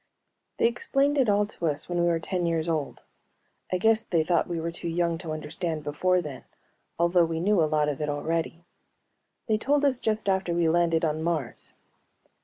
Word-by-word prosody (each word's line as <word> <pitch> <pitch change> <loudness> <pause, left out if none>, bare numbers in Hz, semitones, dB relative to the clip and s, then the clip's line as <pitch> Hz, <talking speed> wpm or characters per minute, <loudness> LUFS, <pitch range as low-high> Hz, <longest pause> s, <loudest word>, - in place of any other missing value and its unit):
They - - +2
explained 275 +4 +1
it 250 -5 +3
all 205 0 +3
to 175 -5 -4
us 145 -1 -1
when 175 -1 -1
we 170 - +2
were 170 -1 +2
ten 175 +1 -2
years 165 -1 0
old; 155 -4 -2 0.7
I 185 - +2
guess 220 +3 +3
they 170 -7 +1
thought 170 0 +1
we 170 -1 -2
were 165 +1 -3
too 170 - -7
young 170 0 0
to 165 -3 -6
understand 155 +1 -4
before 180 +5 +1
then, 140 -4 -8 0.5
although 170 +1 +3
we 165 -1 -1
knew 195 +1 +2
a 155 - +2
lot 150 -1 +2
of 145 -1 -3
it 150 - -1
already. 165 +3 -2 0.8
They 215 -2 +1
told 290 +4 +2
us 260 -3 +2
just 215 -1 -1
after 190 -3 +1
we 170 -1 +2
landed 165 0 +2
on 155 0 -1
Mars. 160 -7 -3
170 Hz, 200 wpm, -27 LUFS, 160-190 Hz, 0.8 s, it